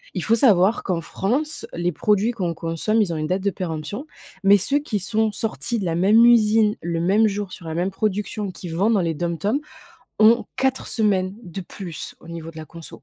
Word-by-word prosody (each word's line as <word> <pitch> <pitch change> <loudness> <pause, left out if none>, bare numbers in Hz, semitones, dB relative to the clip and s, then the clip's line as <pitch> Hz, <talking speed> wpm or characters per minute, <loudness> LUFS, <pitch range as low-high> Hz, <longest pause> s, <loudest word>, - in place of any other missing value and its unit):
il - - -2
faut 225 - +3
savoir 215 -3 +4
qu'en 180 -3 -1
France, 265 - -2
les 175 +1 -1
produits 210 +6 +1
qu'on 180 -8 -2
consomme, 165 +7 -1
ils 195 -5 0
ont - - -3
une 155 - -2
date 185 +4 -1
de 200 - +2
péremption, 180 - -5 0.4
mais 200 +1 +7
ceux 275 +9 +1
qui 225 -8 -3
sont 220 +3 0
sortis 230 +2 -2
de 195 - -3
la 165 -2 -1
même 205 +6 +5
usine, 220 -2 +4
le 170 0 -2
même 205 +6 +3
jour, 205 -2 -4
sur 175 - -11
la 160 - -4
même 175 +3 0
production, 205 0 -2
qu'ils 175 -2 -8
vendent 205 +6 +2
dans 200 - +2
les 165 -2 -1
DOM-TOM, 175 - -1 0.6
ont 225 +2 +6
4 265 0 0
semaines 195 -4 0
de 185 0 -7
plus 175 -2 -7
au 165 - -15
niveau 165 -1 -7
de - - -18
la 160 - -7
conso. 165 0 -12
195 Hz, 210 wpm, -22 LUFS, 170-220 Hz, 0.6 s, mais